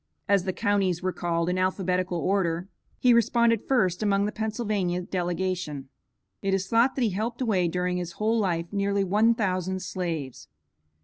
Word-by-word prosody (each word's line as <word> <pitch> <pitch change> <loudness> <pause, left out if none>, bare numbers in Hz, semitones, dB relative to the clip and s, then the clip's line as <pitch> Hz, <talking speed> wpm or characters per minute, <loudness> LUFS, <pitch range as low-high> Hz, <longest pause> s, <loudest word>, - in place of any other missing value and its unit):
As 200 -2 +3
the 190 - 0
counties 195 -4 0
were 185 - +1
called 170 -1 -1
in 180 +1 0
alphabetical 185 -1 0
order, 175 -1 0 0.3
he 250 -1 +4
responded 235 -1 +3
first 190 -9 +2
among 200 -1 +2
the 210 - -1
Pennsylvania 215 -5 -1
delegation. 180 -5 -3 0.5
It 195 -1 +1
is 195 0 -1
thought 230 +5 +3
that 260 - 0
he 220 - +2
helped 225 +5 -3
away 205 -8 +1
during 180 +1 -1
his 175 -1 -4
whole 220 +4 +1
life, 170 -5 0
nearly 200 0 +1
one 215 +5 +3
thousand 185 -3 -1
slaves. 165 -9 -4
190 Hz, 165 wpm, -26 LUFS, 180-215 Hz, 0.5 s, he